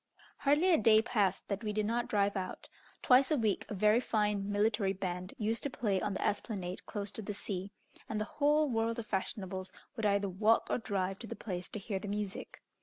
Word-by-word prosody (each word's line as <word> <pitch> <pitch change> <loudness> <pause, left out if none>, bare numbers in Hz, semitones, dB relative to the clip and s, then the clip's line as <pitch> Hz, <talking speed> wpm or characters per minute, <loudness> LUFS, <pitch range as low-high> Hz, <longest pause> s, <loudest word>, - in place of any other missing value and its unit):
Hardly 300 +6 +4
a - - +5
day 220 0 +6
passed 200 -6 +1
that 200 +1 -3
we 210 - -1
did 215 0 0
not 235 +2 0
drive 200 -1 +1
out. 185 -1 -4 0.4
Twice 255 +1 +6
a 305 - +2
week 220 -5 0
a 210 - -3
very 210 +3 +4
fine 210 -4 0
military 205 -1 +2
band 185 -1 -4
used 225 +1 -1
to 285 - -2
play 205 -7 0
on 205 -2 -1
the - - -2
esplanade 190 -3 -3
close 205 -1 -4
to 220 - -6
the 205 0 -5
sea, 195 -1 -4 0.4
and 215 - -1
the 215 - -1
whole 300 +4 +2
world 230 -2 0
of 235 - -4
fashionables 190 -2 -3 0.2
would 220 -2 +1
either 200 0 +2
walk 210 +4 +3
or - - +1
drive 195 -3 -2
to 230 - -8
the - - -5
place 180 -5 -5
to - - -5
hear 200 -1 -3
the 205 - -7
music. 205 -1 -4
210 Hz, 215 wpm, -33 LUFS, 195-225 Hz, 0.4 s, day